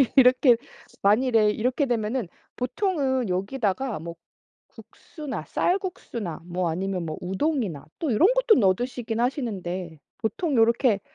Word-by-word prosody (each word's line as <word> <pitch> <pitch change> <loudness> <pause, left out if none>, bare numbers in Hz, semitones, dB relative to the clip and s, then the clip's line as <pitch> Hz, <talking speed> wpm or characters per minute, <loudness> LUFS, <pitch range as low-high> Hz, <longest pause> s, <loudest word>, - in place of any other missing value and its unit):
이렇게 250 -2 +6 0.4
만일에 215 +1 +4
이렇게 255 +6 0
되면은 230 -2 -1 0.3
보통은 260 - 0
여기다가 205 - -1
뭐 170 +1 -7 0.5
국수나 300 -5 -8
쌀국수나 350 - -2
뭐 180 0 -1
아니면 185 +1 -2
뭐 155 - -5
우동이나 190 - -1
또 310 -6 -1
이런 320 - +5
것도 - - +5
넣어 190 -3 +5
드시긴 245 -1 -4
하시는데 190 - -3 0.2
보통 280 +6 -1
요렇게 230 -2 +3
230 Hz, 295 characters per minute, -25 LUFS, 190-265 Hz, 0.5 s, 이렇게